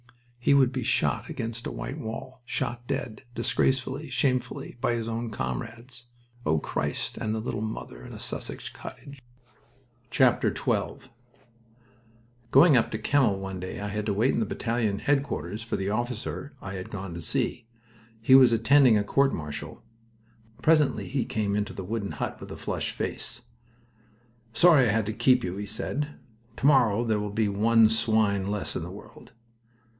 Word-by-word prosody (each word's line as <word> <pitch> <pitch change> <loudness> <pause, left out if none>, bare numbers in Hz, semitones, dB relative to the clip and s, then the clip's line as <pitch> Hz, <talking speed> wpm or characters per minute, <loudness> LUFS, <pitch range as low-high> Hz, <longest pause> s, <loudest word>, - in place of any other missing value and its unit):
He 130 +3 +4
would 130 -2 +5
be 130 -1 -3
shot - - +1
against 115 +1 -4
a - - -4
white 140 - -5
wall. 130 +2 -7
Shot 120 0 -3
dead, 110 - -3
disgracefully, 130 +4 0
shamefully, 130 -3 -1
by 125 - +2
his 115 -1 -3
own 115 +1 -3
comrades! 115 - -6 0.4
O 80 +1 +2
Christ! - - -2
and 110 0 -1
the - - -2
little 110 -1 -3
mother 85 - -6
in - - -10
a - - -8
Sussex - - -4
cottage!... 140 -1 -10 0.9
XII - - +5 2.2
Going 145 +2 +7
up 120 - +3
to 110 - -3
Kemmel 130 -6 +2
one 95 -1 -5
day 90 +1 -6
I 105 0 -3
had 105 +1 -3
to 105 - +1
wait 115 +6 +3
in - - +1
battalion 115 -4 -1
headquarters 135 -7 -1
for 115 - -3
the 95 +1 -2
officer 120 +4 -3
I 95 - -7
had 95 -1 -6
gone 95 -3 -6
to 85 - -6
see. 115 +7 -2 0.5
He 115 +4 +3
was 130 -2 +8
attending 120 +1 +5
a 105 - +1
court 135 +6 +2
martial. 75 -2 -7 0.8
Presently 155 -3 +3
he 130 -1 0
came 105 -2 -1
into 105 0 -2
the 95 - -6
wooden 100 +1 -3
hut, - - -4
with - - -9
a - - -7
flushed - - -3
face. 120 - -4 1.1
"Sorry 150 -5 +6
I - - +3
had 110 -1 +1
to 110 - -3
keep 125 +2 +3
you," 90 +1 -3
he 100 0 -5
said. 145 +7 -3 0.4
"Tomorrow 120 -4 +4
there 110 -3 +1
will 105 0 -3
be 105 +1 +1
one 110 +3 +4
swine 110 -3 +2
less 105 -1 -2
in - - -2
the 85 - -6
world." 100 +4 -13
115 Hz, 165 wpm, -27 LUFS, 105-130 Hz, 2.2 s, was